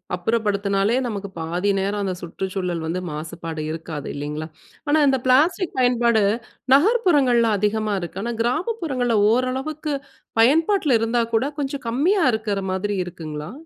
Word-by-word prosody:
அப்புறப்படுத்துனாலே, 200 Hz, +1 st, 0 dB
நமக்கு 200 Hz, -3 st, -5 dB
பாதி 175 Hz, +5 st, -1 dB
நேரம் 200 Hz, +2 st, -1 dB
அந்த 190 Hz, -2 st, -1 dB
சுற்றுச்சூழல் 180 Hz, -1 st, -3 dB
வந்து 170 Hz, +3 st, -2 dB
மாசுபாடு 160 Hz, +1 st, -6 dB
இருக்காது. 160 Hz, -2 st, -6 dB
இல்லைங்களா? 150 Hz, +2 st, -4 dB, 0.4 s
ஆனா, 300 Hz, -, +4 dB
இந்த 265 Hz, -1 st, +2 dB
பிளாஸ்டிக் 320 Hz, +8 st, +3 dB
பயன்பாடு, 240 Hz, -3 st, +3 dB, 0.5 s
நகர்ப்புறங்கள்ல 285 Hz, -, +3 dB
அதிகமா 210 Hz, +1 st, 0 dB
இருக்கு. 175 Hz, +2 st, -6 dB
ஆனா, 235 Hz, +1 st, -2 dB
கிராமப்புறங்கள்ல 255 Hz, -, 0 dB
ஓரளவுக்கு 265 Hz, +5 st, -1 dB, 0.5 s
பயன்பாட்ல 310 Hz, -, +4 dB
இருந்தா 230 Hz, +1 st, +1 dB
கூட, 225 Hz, +4 st, +2 dB
கொஞ்சம் 275 Hz, -2 st, -3 dB
கம்மியா 335 Hz, -, +2 dB
இருக்குற 215 Hz, -2 st, -1 dB
மாதிரி, 205 Hz, +2 st, -2 dB
இருக்குங்களா? 155 Hz, -2 st, -7 dB
225 Hz, 125 wpm, -22 LUFS, 185-265 Hz, 0.5 s, ஆனா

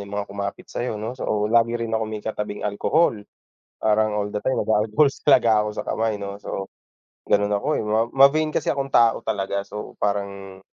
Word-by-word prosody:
yung 100 Hz, -, -5 dB
mga 100 Hz, 0 st, -3 dB
kumapit 100 Hz, 0 st, -5 dB
sayo, 120 Hz, -2 st, -3 dB
'no, 110 Hz, +3 st, -4 dB
so, 105 Hz, -4 st, -1 dB
lagi 115 Hz, 0 st, +3 dB
rin 115 Hz, -1 st, -4 dB
ako 110 Hz, 0 st, +1 dB
may 110 Hz, -1 st, -6 dB
katabing 105 Hz, -1 st, -4 dB
alcohol, 140 Hz, +11 st, +2 dB, 0.6 s
parang 110 Hz, 0 st, +1 dB
all 105 Hz, 0 st, -2 dB
the 105 Hz, -, -2 dB
time 130 Hz, -, 0 dB
nag-a-alcohol 110 Hz, +7 st, +2 dB, 0.2 s
talaga 120 Hz, -2 st, +6 dB
ako 105 Hz, -, -1 dB
sa -, -, -3 dB
kamay, 110 Hz, -1 st, -1 dB
'no, 100 Hz, 0 st, -7 dB
so, 95 Hz, -1 st, -6 dB, 0.5 s
ganun 105 Hz, 0 st, +2 dB
ako, 100 Hz, -, -5 dB
eh, -, -, 0 dB
ma 110 Hz, +1 st, +1 dB
ma-vain 150 Hz, +3 st, +4 dB
kasi -, -, 0 dB
akong 135 Hz, -1 st, -2 dB
tao 115 Hz, -1 st, +4 dB
talaga 100 Hz, 0 st, -2 dB
so 105 Hz, +1 st, -8 dB
parang, 100 Hz, -2 st, -3 dB
105 Hz, 190 wpm, -23 LUFS, 100-115 Hz, 0.6 s, talaga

